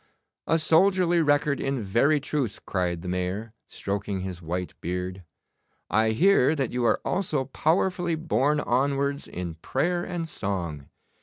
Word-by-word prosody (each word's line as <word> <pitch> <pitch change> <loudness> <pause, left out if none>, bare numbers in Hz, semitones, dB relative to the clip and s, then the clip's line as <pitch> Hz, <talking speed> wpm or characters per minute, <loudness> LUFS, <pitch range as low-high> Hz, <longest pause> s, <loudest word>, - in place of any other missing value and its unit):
'A 165 - +3
soldierly 175 +2 +4
record 145 -1 +2
in 135 -4 -1
very 130 +10 +3
truth,' 140 -5 -3
cried 90 -2 -1
the - - -6
Mayor, 90 +5 -3
stroking 100 -1 -3
his 90 -2 -6
white 90 +2 -4
beard. 90 +2 -3 0.7
'I 110 0 +3
hear 160 - +4
that 135 -5 -1
you 125 0 -1
are - - +3
also 155 -8 0
powerfully 170 +4 +1
borne 150 -2 +1
onwards 140 +2 0
in 90 -2 -5
prayer 175 +6 0
and 175 -2 -4
song. 85 - -4
135 Hz, 140 wpm, -26 LUFS, 95-160 Hz, 0.7 s, soldierly